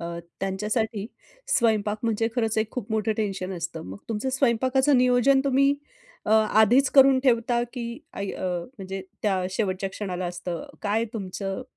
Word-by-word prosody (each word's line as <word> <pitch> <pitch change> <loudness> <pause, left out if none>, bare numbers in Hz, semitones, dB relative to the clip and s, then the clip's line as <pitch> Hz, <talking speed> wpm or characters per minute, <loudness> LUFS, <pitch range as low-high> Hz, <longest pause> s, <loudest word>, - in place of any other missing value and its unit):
अ, 170 - -5 0.4
त्यांच्यासाठी 210 +2 -1 0.5
स्वयंपाक 215 -3 +1
म्हणजे 225 -1 +1
खरंच 225 -2 +1
एक 220 0 0
खूप 235 -4 -5
मोठं 220 0 +1
टेन्शन 195 -3 -2
असतं. 165 -1 -5
मग 95 +2 -8
तुमचं 225 +3 -2
स्वयंपाकाचं 260 +2 +3
नियोजन 250 +2 +4
तुम्ही 275 +1 +3 0.5
अ, - - -3
आधीच 220 +4 +4
करून 270 -1 +7
ठेवता 240 -2 +2
की 245 -2 -4 0.3
ऐ 200 - -3
अ, - - -5 0.3
म्हणजे 195 0 -5 0.2
त्या 190 -3 +1
शेवटच्या 190 -1 -1
क्षणाला 185 -3 -4
असतं? 175 -1 -5 0.2
काय 215 +2 +1
तुमचं 195 +1 -4
220 Hz, 150 wpm, -25 LUFS, 195-245 Hz, 0.5 s, करून